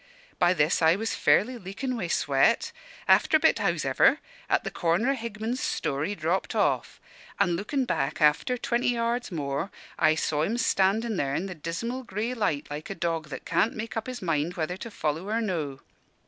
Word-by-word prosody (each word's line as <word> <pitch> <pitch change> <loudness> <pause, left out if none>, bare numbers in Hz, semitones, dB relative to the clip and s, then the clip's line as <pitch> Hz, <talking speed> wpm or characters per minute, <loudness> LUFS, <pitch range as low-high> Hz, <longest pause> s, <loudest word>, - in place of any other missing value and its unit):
By 175 +1 +4
this, 150 +1 +2
I 160 +1 +5
was 225 +3 -2
fairly 245 +3 +2
leakin' 225 +7 -4
wi' 195 -7 -3
sweat. 140 -4 +2 0.4
After - - +5
a - - -7
bit, - - +3
hows'ever, - - +3 0.3
at - - +2
the - - -4
corner 175 +10 +1
o' - - 0
Higman's 230 +1 -4
store, 140 - -1
he 205 - -3
dropped 170 +2 -1
off; - - 0 0.4
an' 175 - +3
lookin' 255 - -1
back 135 - -1
after 150 - +3
twenty 240 0 0
yards 235 0 -1
more, 145 +1 -2 0.3
I 155 0 +4
saw 150 -1 0
him 215 +9 0
standin' 220 0 +1
there 140 -3 0
in 185 - -1
the 190 - -5
dismal 180 - -4
grey 225 +1 -3
light 205 - -1
like 150 +1 -6
a 195 - -4
dog 165 -3 -2
that 140 - -7
can't 220 - +1
make 220 +1 -5
up 225 +1 -3
his 255 -5 -6
mind 165 0 0
whether 170 0 -2
to 215 +5 -7
follow 160 -1 -3
or 225 +2 +1
no. 160 -11 -3
190 Hz, 190 wpm, -27 LUFS, 155-230 Hz, 0.4 s, I